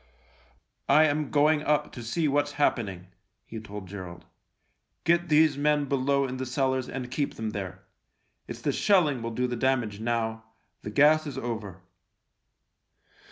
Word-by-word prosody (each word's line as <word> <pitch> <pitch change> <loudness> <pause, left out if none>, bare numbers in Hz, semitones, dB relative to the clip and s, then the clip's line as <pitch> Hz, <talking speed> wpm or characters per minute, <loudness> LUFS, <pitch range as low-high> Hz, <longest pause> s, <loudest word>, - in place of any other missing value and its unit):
" - - -36 0.3
I 150 +3 +7
am 150 -1 +1
going 150 +1 +3
up 150 0 0
to 120 - -8
see 150 +8 -1
what's 145 0 0
happening," 100 -11 -1 0.4
he 110 - -7
told 105 -2 -9
Gerald. 90 -2 -9 0.4
" - - -48
Get 170 +1 +2
these 150 -2 +4
men 150 0 +2
below 140 0 +1
in 130 0 -5
the 130 - -3
cellars 130 0 0
and 125 -2 -6
keep 140 +1 -2
them 110 -1 -4
there. 100 -4 -6 0.6
It's - - -7
the - - 0
THE - - -5
LIEUTENANT - - -3
51 - - -4
shelling 165 - +3
will 115 - -3
do 125 - 0
the 125 -1 -2
damage 120 -4 0
now 110 -1 -2 0.2
— - - -47
the - - -6
gas 150 +6 +4
is 145 - -6
over." 105 -6 -5
130 Hz, 180 wpm, -27 LUFS, 110-150 Hz, 0.6 s, I